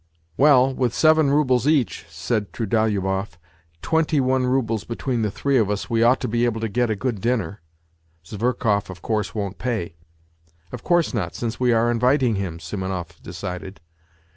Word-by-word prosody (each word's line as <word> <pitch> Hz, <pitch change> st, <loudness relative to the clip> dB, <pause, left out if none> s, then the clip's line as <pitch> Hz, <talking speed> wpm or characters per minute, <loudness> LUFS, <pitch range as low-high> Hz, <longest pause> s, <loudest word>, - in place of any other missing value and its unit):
" -, -, -41 dB
Well, 135 Hz, -, +5 dB
with 125 Hz, -3 st, -1 dB
seven 155 Hz, -2 st, +4 dB
roubles 135 Hz, -3 st, +2 dB
each." 145 Hz, -, +1 dB
said 100 Hz, +6 st, -2 dB
Trudolyubov, 100 Hz, -5 st, -1 dB, 0.2 s
" 80 Hz, 0 st, -39 dB
twenty 160 Hz, -2 st, +1 dB
one 130 Hz, -1 st, +1 dB
roubles 115 Hz, -5 st, 0 dB
between 120 Hz, +2 st, -3 dB
the 105 Hz, -, 0 dB
three 140 Hz, +6 st, 0 dB
of 105 Hz, -3 st, +1 dB
us, 105 Hz, +2 st, -3 dB
we 115 Hz, -1 st, +2 dB
ought 120 Hz, +3 st, +4 dB
to -, -, -1 dB
be 115 Hz, +2 st, 0 dB
able 115 Hz, -2 st, -1 dB
to 115 Hz, -, -1 dB
get 120 Hz, +3 st, 0 dB
a 110 Hz, -, 0 dB
good 110 Hz, -1 st, -3 dB
dinner. 110 Hz, -5 st, -1 dB, 0.6 s
Zverkov, 105 Hz, 0 st, -1 dB
of 95 Hz, -3 st, -10 dB
course, 110 Hz, -2 st, -2 dB
won't 100 Hz, -2 st, -4 dB
pay." 110 Hz, -10 st, -3 dB, 0.4 s
" 80 Hz, 0 st, -36 dB
Of 125 Hz, -, -7 dB
course 175 Hz, -4 st, +2 dB
not, 100 Hz, -8 st, -3 dB
since 115 Hz, -1 st, -4 dB
we 125 Hz, -1 st, +3 dB
are 115 Hz, +1 st, +3 dB
inviting 125 Hz, +1 st, +2 dB
him," 95 Hz, -5 st, -3 dB
Simonov 90 Hz, -2 st, -5 dB
decided. 90 Hz, +1 st, -7 dB
115 Hz, 180 wpm, -22 LUFS, 95-125 Hz, 0.6 s, Well